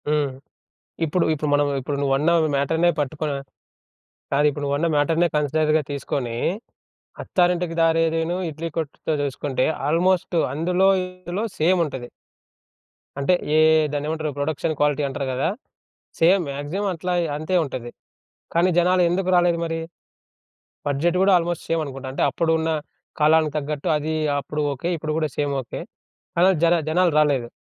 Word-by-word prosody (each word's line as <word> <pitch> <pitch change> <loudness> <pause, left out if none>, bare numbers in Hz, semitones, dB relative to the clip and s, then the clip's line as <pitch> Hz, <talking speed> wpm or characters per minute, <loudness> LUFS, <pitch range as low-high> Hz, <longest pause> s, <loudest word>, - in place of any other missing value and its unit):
హ్మ్. 150 -2 +1 0.8
ఇప్పుడు 170 +3 +1
ఇప్పుడు 150 0 -3
మనం 145 0 +3
ఇప్పుడు 140 +2 -3
నువ్వన్నావు 150 +5 +2
ఈ - - -3
మ్యాటర్‌నే 160 +5 +2
పట్టుకొనా? 145 0 -2 1.0
కాదు, 145 +2 +3
ఇప్పుడు 145 0 -5
నువ్వన్న 145 +4 0
మ్యాటర్‌నే 160 +4 +2
కన్సిడర్‌గా 155 +1 +2
తీసుకొని, 135 -4 -3 0.9
అత్తారింటికి 175 -2 +1
దారేదిను, 165 +1 +2
ఇడ్లీ 160 +2 -5
కొట్టుతో 160 0 -3
జూసుకుంటే 140 -1 -1 0.2
ఆల్మోస్ట్ 175 +2 +1 0.2
అందులో 180 +5 +2
ఇందులో 185 +2 -5
సేమ్ 175 +4 +3
ఉంటది. 130 -5 -6 1.1
అంటే 140 +6 +2 0.2
ఏ - - +5 0.4
దాన్నేమంటారు 155 +1 -2
ప్రొడక్షన్ 155 +2 -1
క్వాలిటీ 145 0 +2
అంటారు 135 0 -4
గదా! 130 +1 0 0.7
సేమ్. 180 +2 +4
మాక్సిమం 160 +9 -3
అట్లగే 175 +1 -1
అంతే 155 +5 -1
ఉంటది. 120 -4 -6 0.6
కానీ 170 +2 +3
జనాలు 180 +1 +4
ఎందుకు 185 +2 0
రాలేదు 175 -1 +3
మరి? 165 0 -3 1.1
బడ్జెట్ 150 +5 +1
గూడా 195 +1 +4
ఆల్మోస్ట్ 175 0 -3
సేమ్ 165 0 +1
అనుకుంటా. 135 -2 -7
అంటే - - -2
అప్పుడున్న 160 -1 0 0.5
కాలానికి 155 0 +4
తగ్గట్టు 150 0 -3
అది 155 +1 -2 0.3
అప్పుడు 150 +2 -5
ఓకే. 140 +6 -4
ఇప్పుడు 155 0 -3
గూడా 155 -1 0
సేమ్ 145 -1 0
ఓకే. 120 - -7 0.6
కానీ 175 +2 +5 0.2
జన 170 +1 +5 0.2
జనాలు 175 +1 +3
రాలేదు. 140 -6 +2
155 Hz, 135 wpm, -23 LUFS, 145-170 Hz, 1.1 s, ఏ